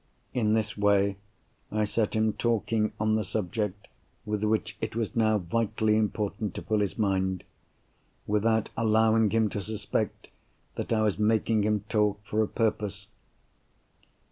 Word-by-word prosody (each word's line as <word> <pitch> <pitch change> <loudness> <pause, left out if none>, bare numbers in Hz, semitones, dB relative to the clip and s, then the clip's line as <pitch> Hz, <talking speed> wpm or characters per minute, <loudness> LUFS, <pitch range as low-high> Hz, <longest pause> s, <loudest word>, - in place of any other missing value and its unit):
In 110 -3 +2
this 110 -1 -1
way, 100 -1 +2 0.5
I 110 0 +1
set 105 +1 0
him 110 0 +2
talking 110 -1 0
on 110 0 +2
the 110 0 +1
subject 105 +1 -3 0.4
with 105 0 -2
which 110 0 0
it 110 -1 -3
was 115 -2 -2
now 110 -2 +3
vitally 110 +3 0
important 105 -1 -1
to - - -5
fill 110 -1 +1
his 100 -2 -1
mind—without 105 +2 -2
allowing 110 -1 +3
him 110 +1 +2
to 100 - -3
suspect 105 +2 -3 0.4
that - - -5
I 110 -1 +3
was 105 -1 0
making 110 0 +2
him 105 0 +1
talk 105 -2 +1
for 105 +1 0
a 110 - +1
purpose. 105 -2 -1
105 Hz, 145 wpm, -28 LUFS, 105-110 Hz, 0.5 s, now